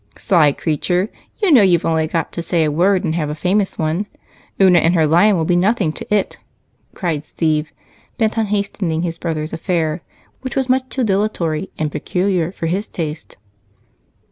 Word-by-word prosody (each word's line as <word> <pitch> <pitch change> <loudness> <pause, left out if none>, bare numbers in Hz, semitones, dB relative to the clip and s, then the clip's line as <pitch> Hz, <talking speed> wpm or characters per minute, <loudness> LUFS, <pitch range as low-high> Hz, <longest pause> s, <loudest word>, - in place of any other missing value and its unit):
"Sly 165 -7 +3
creature! 175 +7 -1 0.3
You 385 - +4
know 260 -7 +7
you've 180 -4 +3
only 160 -1 +1
got 165 0 -2
to 170 - -4
say 165 -1 +1
a 155 - +1
word 185 +5 +2
and 160 -4 -1
have 155 -3 -1
a 150 - -3
famous 190 +5 0
one. 165 +6 -1 0.5
Una 185 -3 +6
and 165 +2 +2
her 160 -2 +4
lion 180 +6 +4
will 160 - 0
be 175 - +2
nothing 190 -1 +2
to - - -10
it," 210 -2 0 0.6
cried 165 -6 -2
Steve, 155 -1 -1 0.5
bent 220 -2 +1
on 225 -2 0
hastening 200 -5 -1
his 165 -1 -3
brother's 155 -2 -3
affair, 165 -1 -1 0.4
which 260 -1 -6
was 265 -1 0
much 260 0 +1
too 260 - -2
dilatory 190 -5 -1
and 155 -1 -2
peculiar 180 -1 -1
for 170 - -6
his 190 +6 -1
taste. 160 -1 -6
175 Hz, 180 wpm, -18 LUFS, 160-200 Hz, 0.6 s, know